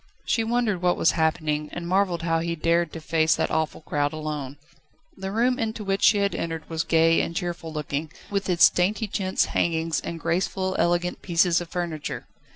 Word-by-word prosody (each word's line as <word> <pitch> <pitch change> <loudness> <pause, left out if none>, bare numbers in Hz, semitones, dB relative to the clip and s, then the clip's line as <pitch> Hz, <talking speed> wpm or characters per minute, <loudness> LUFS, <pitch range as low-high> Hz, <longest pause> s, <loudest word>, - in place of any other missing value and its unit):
She 225 - +1
wondered 225 -5 0
what 180 -1 +2
was - - +4
happening, 155 -2 0
and 175 -1 -5
marvelled 185 -2 +1
how 165 -1 +1
he 170 0 -2
dared 170 0 +1
to 165 - -5
face 160 0 +2
that - - -1
awful 160 0 -1
crowd 145 -1 -1
alone. 150 -3 -5 0.6
The 190 0 -5
room 245 +4 +1
into 220 -1 -2
which 195 0 -1
she 210 - +6
had 200 0 +1
entered 165 -1 -4
was 165 0 -2
gay 165 0 +4
and 170 - -4
cheerful 170 -1 -4
looking 150 0 -3 0.2
with 200 -1 -1
its 175 -1 +7
dainty 195 +5 +1
chintz 190 -2 0
hangings 165 -1 +1
and 170 - -6
graceful, 185 +2 -1
elegant 175 +1 +1
pieces 175 0 +2
of 175 - -7
furniture. 170 -4 -4
170 Hz, 185 wpm, -25 LUFS, 160-190 Hz, 0.6 s, its